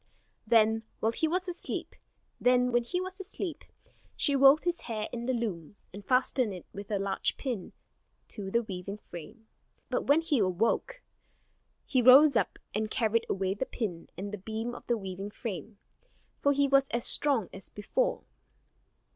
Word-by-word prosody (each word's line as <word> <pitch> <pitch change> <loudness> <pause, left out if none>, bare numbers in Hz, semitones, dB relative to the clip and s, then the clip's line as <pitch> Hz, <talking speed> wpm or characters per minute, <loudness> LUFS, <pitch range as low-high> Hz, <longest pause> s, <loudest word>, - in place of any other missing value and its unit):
Then, 225 -1 +4 0.2
while 220 - +1
he 320 +7 0
was 365 +3 -1
asleep, 355 0 -4 2.2
she 285 - +3
wove 275 +3 +7
his 350 -1 -1
hair 215 -2 -4
in 235 0 -5
the 260 - +1
loom, 205 -7 -4 0.2
and 200 +1 -9
fastened 255 -2 +2
it 180 - -10
with 200 0 -8
a 210 - 0
large 195 0 -1
pin 240 -9 -4 0.6
to 200 -3 -5
the 235 +4 +1
weaving 195 0 -6
frame. 210 +5 -11 0.4
But - - -1
when 290 +3 +5
he 320 -5 +1
awoke, 220 - 0 0.8
he 260 -3 +2
rose 265 +3 +8
up, - - +1 0.2
and 215 +1 -1
carried 225 +1 +1
away 190 0 0
the 210 +6 -3
pin 180 -8 -4
and 200 +2 -5
the 210 - -4
beam 220 +4 -4
of - - -11
the 240 - +1
weaving 195 0 -6
frame; 210 - -6 0.6
for 285 - +4
he 280 0 +3
was 275 0 +4
as 235 -1 -2
strong 270 -10 +3
as 190 - -9
before. 355 - -1
225 Hz, 155 wpm, -30 LUFS, 200-270 Hz, 2.2 s, rose